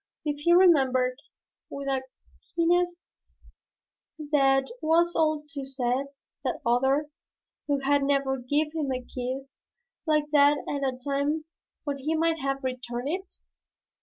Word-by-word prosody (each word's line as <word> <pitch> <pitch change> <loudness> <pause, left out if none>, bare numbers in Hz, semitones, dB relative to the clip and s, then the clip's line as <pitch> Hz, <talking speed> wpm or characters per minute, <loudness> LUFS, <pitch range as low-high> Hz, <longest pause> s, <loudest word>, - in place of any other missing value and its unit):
Did 295 -1 -1
he 340 +4 +2
remember, 265 -8 +5 0.5
with 280 0 -6
a 270 -1 0 0.5
keenness 350 +1 +2 1.3
that 270 - +3
was 340 +2 +3
all 310 -1 +1
too 280 -3 -6
sad, 260 0 -1 0.4
that 255 - -2
other, 265 +5 +2 0.6
who 285 -2 +1
had 285 +1 +3
never 275 -1 +1
given 290 +5 0
him 300 -4 -2
a 255 - -1
kiss 260 +2 -6 0.5
like 300 -1 +1
that 290 0 +5
at 280 -2 -1
a - - -10
time 285 +4 -1 0.4
when 285 -2 -3
he 305 +4 -1
might 325 0 +1
have 275 0 -2
returned 255 0 -3
it? 375 +3 -4
280 Hz, 135 wpm, -27 LUFS, 265-310 Hz, 1.3 s, remember